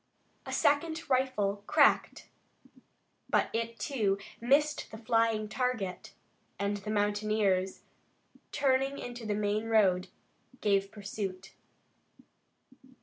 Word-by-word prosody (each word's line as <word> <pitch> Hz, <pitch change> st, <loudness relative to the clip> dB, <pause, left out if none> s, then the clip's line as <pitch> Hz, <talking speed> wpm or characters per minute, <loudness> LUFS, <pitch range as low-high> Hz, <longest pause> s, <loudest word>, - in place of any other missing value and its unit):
A -, -, -4 dB
second 315 Hz, +3 st, +1 dB
rifle 215 Hz, -6 st, +1 dB
cracked -, -, +3 dB, 1.0 s
but -, -, +2 dB
it, 230 Hz, 0 st, -2 dB
too, 205 Hz, -4 st, 0 dB, 0.2 s
missed 290 Hz, +5 st, +2 dB
the 220 Hz, -, -9 dB
flying 225 Hz, -1 st, +1 dB
target, 225 Hz, -5 st, -3 dB, 0.4 s
and 200 Hz, 0 st, -1 dB
the 205 Hz, +1 st, -8 dB
mountaineers, 205 Hz, -2 st, +1 dB, 0.7 s
turning 270 Hz, -1 st, +1 dB
into 240 Hz, -2 st, -7 dB
the 210 Hz, -, 0 dB
main 210 Hz, +1 st, 0 dB
road, 195 Hz, -5 st, +3 dB, 0.5 s
gave 195 Hz, -1 st, +1 dB
pursuit. 195 Hz, -2 st, -6 dB
215 Hz, 95 wpm, -31 LUFS, 200-250 Hz, 1.0 s, cracked